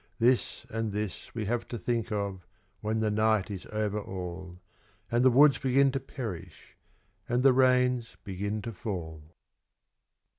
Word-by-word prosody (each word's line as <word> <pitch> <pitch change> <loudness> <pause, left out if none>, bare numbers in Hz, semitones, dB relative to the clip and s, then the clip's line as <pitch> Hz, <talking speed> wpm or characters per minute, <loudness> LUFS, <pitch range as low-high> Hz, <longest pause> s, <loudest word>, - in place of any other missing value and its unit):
This 120 0 +2
and 115 -1 -2
this 105 -1 -4
we 110 -2 -2
have 120 +3 -1
to 120 - -5
think 115 -1 -2
of 100 -3 -2 0.4
when 110 +1 -1
the 110 -1 +1
night 110 -1 +2
is 95 -2 -6
over 105 -1 -1
all, 90 -2 -7 0.5
And 120 +1 +3
the 130 - +7
woods 140 +3 +6
begin 135 +1 +3
to 135 - -1
perish 120 - -8 0.5
and 120 +1 +2
the 135 -1 +7
rains 125 -2 +3
begin 100 +2 -3
to 115 - -4
fall. 85 -6 -6
110 Hz, 150 wpm, -29 LUFS, 100-125 Hz, 0.5 s, the